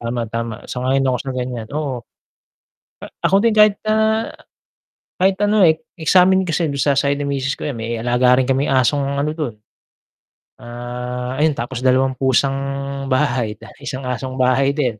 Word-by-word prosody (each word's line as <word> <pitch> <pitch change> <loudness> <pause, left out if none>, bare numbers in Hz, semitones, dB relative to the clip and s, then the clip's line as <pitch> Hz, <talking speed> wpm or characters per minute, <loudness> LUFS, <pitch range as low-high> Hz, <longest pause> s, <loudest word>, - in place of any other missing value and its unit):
Tama, 120 0 -3
tama 115 0 -3
sang-ayon 130 +2 0
ako 125 -1 +1
sa 135 - -5
ganyan 125 -3 -4
oo. 140 -4 -3 1.0
A - - -6 0.2
ako 185 +3 +3
din 230 -1 +3
kahit 210 -1 +5
na 215 - +2 1.3
kahit 190 +1 +3
ano, 210 +1 +2
eh, 160 - +3 0.2
eh, 160 - -4
samin 190 +1 +5
kasi 165 0 0
don 140 - -3
sa 140 0 +2
side 140 +1 +1
ng 145 - -2
misis 135 -1 -1
ko - - -5
yan 140 - -4
may 115 +1 -3
alaga 125 +1 +3
rin 130 - -1
kaming 135 +1 +1
asong 140 +2 +1
ano 150 +2 0
dun. 145 -9 -3 1.1
Ah, 125 +2 -5
ayun 155 -1 +2
tapos 120 +1 -4
2 130 0 +2
pusang 135 +1 +2 0.5
bahay, 120 -4 0 0.2
1 140 -2 -6
asong 130 +1 -4
bahay 130 +2 +2
din, 125 -8 -1
130 Hz, 170 wpm, -19 LUFS, 125-145 Hz, 1.3 s, kahit